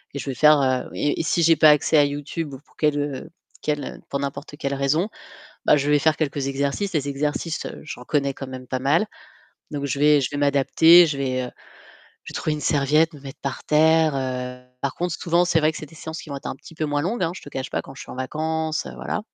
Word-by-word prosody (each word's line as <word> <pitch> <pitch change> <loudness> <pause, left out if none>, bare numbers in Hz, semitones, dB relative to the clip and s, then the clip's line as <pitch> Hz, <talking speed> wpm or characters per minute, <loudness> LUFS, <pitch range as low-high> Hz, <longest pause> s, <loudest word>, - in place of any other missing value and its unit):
et - - -3
je - - -6
vais - - -4
faire, 150 +4 +6
heu 130 -1 0
et 145 - 0
et - - 0
si 170 +1 +1
j'ai 165 0 +6
pas 155 0 +7
accès 150 +1 +4
à 145 - +6
YouTube 145 +1 -4
ou - - -11
pour 145 - -29
quelle 150 -1 +1
heu 145 +1 -4 0.3
quelle 150 -1 -1
heu - - -8
pour 140 - -2
n'importe 140 +1 -5
quelle 140 -1 -2
raison, 140 +8 +1 0.6
bah, - - +5
je 145 0 0
vais 150 - +5
faire 155 +2 +2
quelques 140 -3 -2
exercices. 140 +8 -1
Les 145 -2 0
exercices, 150 +3 -2
heu, - - -8
j'en 140 -5 -8
connais 140 0 0
quand 135 - -7
même 130 -1 -9
pas 130 - -1
mal. 145 +10 +2 0.7
Donc 145 -1 -3
je 140 - -2
vais 150 0 +5
je 130 - -1
vais 145 - -5
m'adapter, 145 +5 +6
je 150 -3 -2
vais, 130 -2 -1
heu, 125 - -4 0.7
je - - -10
vais - - -15
trouver 155 - -1
une 150 - -5
serviette, 150 +3 +2
me 145 - -12
mettre 135 +1 -10
par 140 - -4
terre, 160 0 +4
heu. 125 -1 -3 0.2
Par 140 - -2
contre, 175 -1 -2
souvent 170 +1 +2
c'est 170 -2 +2
vrai 155 0 +3
que 160 - -7
c'est 155 - -8
des 150 - -17
séances 160 0 -7
qui - - -12
vont 140 - -5
être 135 - -8
un - - -5
petit 165 - -14
peu 155 - -2
moins 145 0 0
longues, 210 +8 -1
hein, 165 - +1
je - - -8
te - - -10
cache 135 -2 -5
pas, - - -2
quand 135 - -12
je - - -11
suis - - -11
en - - -8
vacances, 155 +4 -2
heu, - - -7
voilà. - - -3
145 Hz, 265 wpm, -23 LUFS, 140-160 Hz, 0.7 s, pas